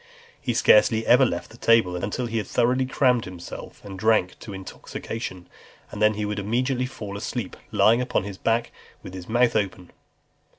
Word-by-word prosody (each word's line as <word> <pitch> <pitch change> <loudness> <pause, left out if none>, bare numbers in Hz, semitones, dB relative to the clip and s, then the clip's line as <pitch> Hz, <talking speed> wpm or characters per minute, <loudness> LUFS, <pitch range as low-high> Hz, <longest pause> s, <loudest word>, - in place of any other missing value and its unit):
He 120 - -2
scarcely 110 0 +5
ever 130 +2 +6
left 85 -4 -4
the 115 - -14
table 115 -7 +3
until 105 +7 -3
he 115 -1 -3
had 110 - -2
thoroughly 130 +2 +1
crammed 125 -2 +2
himself 90 +1 -9
and 95 -2 -8
drank 110 -4 +2
to 110 - -9
intoxication; 95 0 -7 0.4
and 105 - -7
then 105 0 +4
he 105 0 -2
would 105 0 -3
immediately 125 +5 0
fall 105 -6 -7
asleep, 115 -1 -4 0.2
lying 115 +3 +4
upon 125 -5 0
his 100 -1 -7
back 115 +1 0 0.3
with 90 - -9
his 95 0 -8
mouth 120 +1 +3
open. 95 -4 -2
110 Hz, 175 wpm, -24 LUFS, 95-120 Hz, 0.4 s, ever